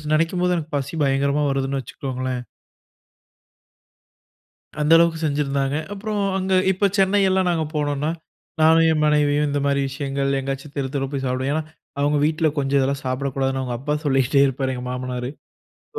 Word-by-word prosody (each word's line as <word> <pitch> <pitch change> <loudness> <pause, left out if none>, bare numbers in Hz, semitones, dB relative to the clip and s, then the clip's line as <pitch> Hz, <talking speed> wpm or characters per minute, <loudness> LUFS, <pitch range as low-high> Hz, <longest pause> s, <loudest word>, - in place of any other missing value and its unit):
ஸ் 150 - -11
நினைக்கும்போது, 180 +3 +1
எனக்கு 155 -2 -5
பசி 140 +3 -5
பயங்கரமா 140 +2 +1
வருதுன்னு 135 0 -1
வச்சிக்கோங்களேன். 130 0 -4 2.4
அந்த 150 +2 +1
அளவுக்கு 165 -1 +3
செஞ்சிருந்தாங்க. 140 -2 0 0.2
அப்பறம் 205 0 -3 0.2
அங்க 190 0 -1 0.2
இப்ப 200 +2 +2
சென்னையெல்லாம் 190 -1 +3
நாங்க 160 -2 0
போனோம்னா, 145 0 -1 0.5
நானும் 165 +1 +6
என் 155 -1 +1
மனைவியும் 150 0 +2
இந்த 145 0 0
மாரி 140 0 +1
விஷயங்கள் 140 0 -1
எங்காச்சும் 135 +2 -5
தெரு 135 -1 -1
தெருவா 135 0 -2
போய் 135 -1 -2
சாப்டுவோம். 130 +2 -1
ஏனா, 160 - -1 0.4
அவுங்க 145 +1 +2
வீட்ல 155 +1 +1
கொஞ்சம் 140 0 +1
இதெல்லாம் 140 +1 -1
சாப்பிடக்கூடாதுன்னு 135 0 -1
அவுங்க 120 -2 -3
அப்பா 150 +3 -1
சொல்லிகிட்டே 135 0 +3
இருப்பாரு 130 0 -2
எங்க 125 0 -6
மாமனாரு. 125 0 -4 0.7
சோ, - - -4
140 Hz, 150 wpm, -22 LUFS, 135-155 Hz, 2.4 s, நானும்